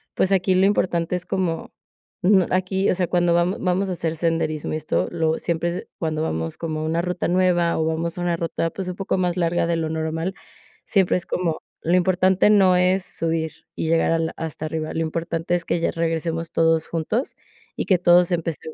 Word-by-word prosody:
pues 190 - +1
aquí 190 -1 +3
lo 185 +1 +4
importante 175 -4 0
es 180 0 -4
como 185 -4 -2 0.5
mm, 190 0 +5
aquí, 190 +1 +1
o - - +1
sea, 180 -1 0
cuando 175 0 +2
vamo 175 +3 +2
vamos 185 +1 0
a - - -1
hacer 165 -2 -2
senderismo 160 -2 -1
y - - 0
esto, 155 0 -1
lo 160 -2 0
siempre 170 +1 -2
cuando 155 -2 -1
vamos 80 - -3
como 155 -2 -3
a - - -3
una 165 +2 0
ruta 180 0 -2
nueva 175 -2 +2
o 160 - +1
vamos 165 +1 -2
a - - -3
una 175 -1 0
ruta, 165 0 -2
pues, 190 -2 -5
un - - -3
poco 195 0 -1
más 180 -2 0
larga 170 -1 +1
de 170 0 0
lo 160 -1 -2
normal, 160 +3 -2 0.5
siempre 190 -4 +2
es 180 - -6
como 170 -3 -2 0.2
lo 170 +2 +2
importante 185 +2 +3
no 190 -3 +5
es 185 +1 +2
subir 160 -1 -2 0.2
y - - -2
llegar 165 0 +3
a 165 - +2
la 160 0 -2
hasta 160 -1 -5
arriba, 155 0 -3
lo - - -2
importante 165 +1 -2
es 175 -1 -3
que 170 - 0
ya - - +1
regresemos 165 0 -2
todos 165 -1 +2
juntos, 170 - -2 0.4
y - - -2
que 185 - +4
todos 175 0 +5
empece 165 -3 -1
170 Hz, 210 wpm, -23 LUFS, 160-180 Hz, 0.5 s, mm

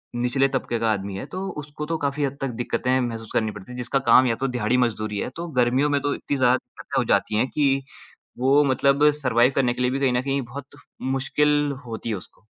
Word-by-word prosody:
निचले 125 +3 +2
तबके 125 -3 -2
का 115 -1 +2
आदमी 100 -2 -3
है। - - -5
तो 190 +1 -3
उसको 150 +1 -7
तो 165 +1 -2
काफ़ी 140 +1 0
हद 140 0 -2
तक 135 - 0
दिक्कतें 130 +1 0
महसूस 115 -2 -4
करनी 110 -1 +1
पड़ती 105 +4 -11
हैं। 125 - -8
जिसका 125 +3 0
काम 130 +1 +7
या 115 - +1
तो 135 +3 -2
दिहाड़ी 125 -1 0
मज़दूरी 110 -4 0
है - - -2
तो 170 +1 -5
गर्मियों 130 +5 +2
में 145 -1 +2
तो 145 0 0
इतनी 140 - -3
ज़्यादा 125 -1 +4
दिक्कतें - - -8
हो - - +2
जाती 105 - +1
हैं 120 +4 +2
कि 135 -2 +1 0.6
वो 135 +3 +4
मतलब 140 +2 +3
सर्वाइव 125 0 +3
करने 125 -3 +2
के 125 - -5
लिए 125 - +2
भी 135 - -1
कहीं 135 -2 +2
न 125 - +1
कहीं 140 +1 -1
बहुत 135 +3 -10 0.4
मुश्किल 145 +2 +1
होती 115 0 -5
है 105 - 0
उसको। 95 +2 -12
130 Hz, 235 wpm, -24 LUFS, 120-140 Hz, 0.6 s, काम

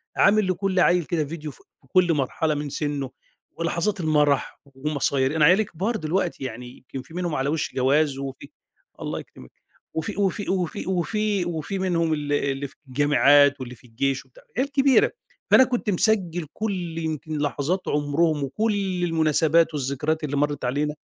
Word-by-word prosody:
عامل 205 0 +4
لكلّ 185 0 0
عيل 180 -1 +4
كده 155 -1 -1
فيديو 155 0 -6
ف 125 - -17 0.3
كلّ 175 +3 +3
مرحلة 150 +2 0
من 145 0 -3
سِنُّه، 140 -2 -3 0.5
ولحظات 170 +4 -1
المرح، 150 -3 +1
ومصاي 140 0 -1
أنا 155 -2 +5
عيالي 185 +7 +5
كبار 200 +5 -3
دلوقتي، 170 -4 -1
يعني 125 0 -7
يمكن 130 0 -8
في 130 - -16
منهم 175 -3 -2
على 135 +1 0
وش 155 0 -2
جواز، 140 +2 +2
وفي 135 +1 -7 0.5
الله - - -3
يكرمك، 65 - -13 0.4
وفي 160 0 -3
وفي 200 0 0
وفي 185 -2 -2
وفي 200 +1 0
وفي 175 +3 -3
منهم 170 -4 +1
ال 145 -1 -2
اللي 140 -1 -1
في - - -21
الجامعات، 145 +1 +4
واللي 125 -1 -7
في 120 +1 -20
الجيش 135 +4 -1
وبتاع، - - -20
عيال 275 +2 0
كبيرة. 275 -2 +4 0.4
فأنا 260 - +8
كنت 245 -3 -1
مسجل 180 -4 +1
كلّ 185 -6 -3
يمكن 155 -1 -3
لحظات 150 +5 -1
عُمرهم، 150 +1 +1
وكلّ 195 +3 -1
المناسبات، 165 0 +3
والذكريات 150 +3 -1
اللي 145 -1 -2
مَرت 145 -2 0
علينا. 145 +4 -1
155 Hz, 160 wpm, -24 LUFS, 145-180 Hz, 0.5 s, فأنا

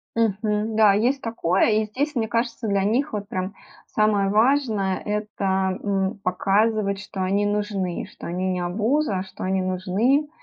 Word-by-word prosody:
Мгм. 215 0 0
Да, 215 -2 +6
есть 250 +6 +1
такое. 195 -5 +1
И 215 0 +2
здесь, 285 +8 -2
мне 225 -2 0
кажется, 230 0 -2
для 200 -1 +1
них 235 +6 0
вот 205 -1 -3
прям 185 +2 -4 0.3
самое 210 -2 +2
важное- 215 -4 +2
это, 195 -3 -1
м, 195 +1 -1
показывать, 200 +2 +1
что 195 -2 -6
они 200 +2 +1
нужны. 205 -4 -2
Что - - -9
они- 185 +2 -1
не 180 - -2
обуза, 210 +3 0
что 190 - -9
они 190 0 0
нужны. 200 +11 +1
205 Hz, 155 wpm, -23 LUFS, 190-225 Hz, 0.3 s, Да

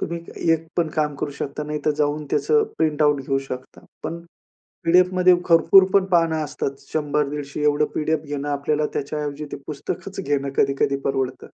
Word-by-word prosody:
तुम्ही 170 0 -3 0.3
एक 165 0 -1
पण 170 -2 +2
काम 150 -1 +1
करू 145 - -3
शकता. 145 +2 -3
नाहीतर 150 0 -1
जाऊन 150 0 0
त्याचं 450 -1 +3 0.2
प्रिंटआउट 150 -2 +2
घेऊ 135 +1 0
शकता. 130 0 -8 0.2
पण 170 +1 -4 0.6
पी-डी-एफमध्ये 180 +1 +5
भरपूरपण 190 +3 +6
पानं 165 -2 +2
असतात. 140 -1 -4 0.2
100-150 150 -1 -2
एवढं 150 0 +3
पी-डी-एफ 155 0 0
घेणं 145 0 -4
आपल्याला 145 +1 0
त्याच्याऐवजी 145 +1 -3
ते - - -3
पुस्तकच 155 +6 -5
घेणं 140 -1 0
कधी-कधी 140 0 +2
परवडतं. 135 -2 -2
150 Hz, 145 wpm, -22 LUFS, 145-165 Hz, 0.6 s, भरपूरपण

